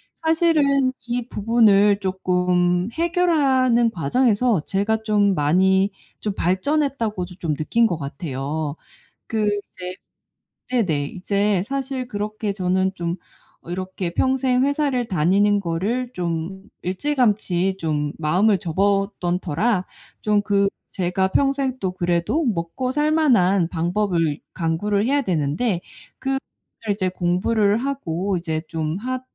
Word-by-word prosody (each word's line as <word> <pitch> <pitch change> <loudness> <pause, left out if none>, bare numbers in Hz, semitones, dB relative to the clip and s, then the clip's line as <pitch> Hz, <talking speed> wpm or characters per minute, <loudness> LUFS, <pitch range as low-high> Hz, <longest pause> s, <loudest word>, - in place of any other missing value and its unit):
사실은 310 -5 +2 0.2
이 240 0 -2
부분을 210 -2 +4
조금 180 -1 +1
해결하는 275 -8 +2
과정에서 220 - +1
제가 220 +3 0
좀 205 -3 +2
많이 190 +6 +3 0.3
좀 210 - -2
발전했다고도 210 - -1
좀 160 -4 -1
느낀 225 +11 +2
것 180 - -1
같아요. 145 0 -4 0.5
그 220 -1 0
이제 185 -3 -4 0.8
네네. 175 - +1
이제 200 +2 0
사실 270 0 -3
그렇게 210 -1 -3
저는 190 0 0
좀 170 0 -3 0.5
이렇게 185 0 -4
평생 260 +1 +2
회사를 280 -4 0
다니는 195 +5 +3
거를 205 +9 -2
좀 175 +2 -3 0.2
일찌감치 195 -4 +1
좀 150 -2 -1
마음을 185 +6 +3
접었던 195 0 0
터라 185 +4 0 0.4
좀 210 -1 +2
그 200 -1 +2 0.2
제가 185 +1 0
평생 275 +2 +1
또 190 -5 -1
그래도 175 - 0
먹고살 255 - -1
만한 200 - +3
방법을 170 -3 0
강구를 200 +5 0
해야 285 +2 +2
되는데 175 - 0 0.4
그거를 270 0 -1 0.5
이제 190 -2 -1
공부를 200 +4 +1
하고 200 -8 -2
이제 160 -2 -3
좀 160 0 -2
하 255 +3 -3
200 Hz, 240 characters per minute, -22 LUFS, 175-240 Hz, 0.8 s, 부분을